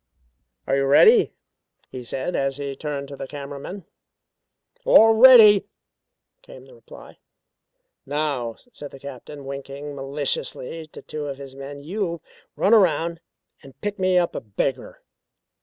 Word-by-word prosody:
"Are 135 Hz, -, 0 dB
you 135 Hz, 0 st, +1 dB
ready?" 435 Hz, -, +5 dB, 0.6 s
he 125 Hz, -, -7 dB
said 130 Hz, +8 st, -4 dB
as 135 Hz, 0 st, -1 dB
he 140 Hz, -1 st, -5 dB
turned 140 Hz, -1 st, -5 dB
to 140 Hz, -, -8 dB
the 135 Hz, 0 st, -7 dB
camera 140 Hz, 0 st, -8 dB
men. 185 Hz, +5 st, -9 dB, 1.0 s
"All 225 Hz, -, +6 dB
ready," 220 Hz, -4 st, +8 dB, 0.7 s
came -, -, -14 dB
the -, -, -17 dB
reply. 480 Hz, -, -15 dB, 0.8 s
"Now," 140 Hz, -5 st, -2 dB, 0.2 s
said 145 Hz, -8 st, -9 dB
the 135 Hz, -, -13 dB
Captain 140 Hz, +1 st, -10 dB
winking 140 Hz, +1 st, -7 dB
maliciously 140 Hz, +2 st, -4 dB
to -, -, -13 dB
two 150 Hz, -1 st, -6 dB
of 140 Hz, -1 st, -6 dB
his 135 Hz, -1 st, -10 dB
men. 140 Hz, +1 st, -9 dB
"You 175 Hz, 0 st, -3 dB, 0.4 s
run 200 Hz, -, +2 dB
around 170 Hz, -5 st, +2 dB, 0.4 s
and 135 Hz, -1 st, -16 dB
pick 205 Hz, -1 st, -4 dB
me 185 Hz, -1 st, +2 dB
up 175 Hz, -1 st, +1 dB
a -, -, -5 dB
beggar." 120 Hz, +5 st, -4 dB
145 Hz, 140 wpm, -23 LUFS, 135-185 Hz, 1.0 s, ready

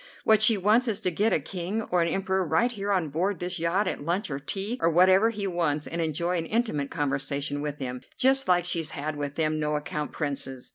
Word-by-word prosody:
What 220 Hz, -1 st, +4 dB
she 215 Hz, 0 st, +5 dB
wants 215 Hz, +6 st, +3 dB
is 215 Hz, -3 st, -1 dB
to 185 Hz, -, +1 dB
get 210 Hz, +6 st, +1 dB
a -, -, +3 dB
King 185 Hz, +7 st, -4 dB
or 180 Hz, -1 st, +3 dB
an 170 Hz, -, +2 dB
Emperor 190 Hz, +2 st, 0 dB
right 180 Hz, +9 st, +1 dB
here 205 Hz, -3 st, -3 dB
on 180 Hz, -6 st, +1 dB
board 180 Hz, +7 st, -1 dB
this 180 Hz, +1 st, -3 dB
yacht 170 Hz, +5 st, +1 dB
at -, -, -3 dB
lunch 170 Hz, +4 st, -1 dB
or 135 Hz, -, -3 dB
tea, 200 Hz, -, -3 dB
or 165 Hz, -, +4 dB
whatever 185 Hz, +6 st, +5 dB
he 205 Hz, -3 st, -4 dB
wants, 165 Hz, -5 st, 0 dB
and 170 Hz, +1 st, -3 dB
enjoy 170 Hz, +3 st, -1 dB
an 165 Hz, -, -4 dB
intimate 215 Hz, -, -1 dB
conversation 145 Hz, -1 st, -2 dB
with 150 Hz, -1 st, -4 dB
him, 125 Hz, -2 st, -5 dB, 0.2 s
just 270 Hz, +1 st, +3 dB
like 175 Hz, -1 st, +3 dB
she's 165 Hz, -3 st, 0 dB
had 150 Hz, +2 st, -3 dB
with 145 Hz, -1 st, -4 dB
them 155 Hz, -1 st, 0 dB
no 150 Hz, 0 st, 0 dB
account 150 Hz, 0 st, -3 dB
Princes. 135 Hz, -4 st, -4 dB
170 Hz, 230 wpm, -27 LUFS, 150-200 Hz, 0.2 s, she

